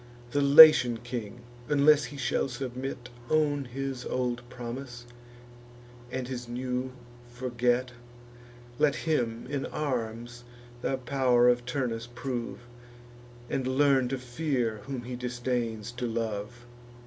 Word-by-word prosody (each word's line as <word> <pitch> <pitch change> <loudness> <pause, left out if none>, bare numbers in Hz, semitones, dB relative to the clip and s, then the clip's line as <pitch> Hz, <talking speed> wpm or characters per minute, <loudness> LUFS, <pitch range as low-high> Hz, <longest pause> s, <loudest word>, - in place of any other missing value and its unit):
The 145 - +1
Latian 140 -4 +9
king, 120 -1 -6 0.3
unless 150 0 +5
he 145 - -9
shall 135 - 0
submit, 125 0 -5 0.2
Own 145 -3 +2
his 130 0 -5
old 125 -1 -2
promise, 125 0 -7 1.1
and 130 -1 -3
his 125 -2 -6
new 125 +1 -3 0.4
forget; 125 0 0 0.9
Let 150 -2 +3
him, 120 -8 -1
in 140 0 -3
arms, 120 -4 -4 0.4
the 135 - -1
pow'r 125 -2 +3
of 120 0 +1
Turnus 120 -3 -2
prove, 120 -1 -5 0.9
And 130 -1 -2
learn 135 -1 +3
to 135 +2 -2
fear 125 -3 -2
whom 135 -3 -5
he 125 +1 -6
disdains 120 -3 -3
to 120 0 -4
love. 115 +1 -4
125 Hz, 115 wpm, -28 LUFS, 120-135 Hz, 1.1 s, Latian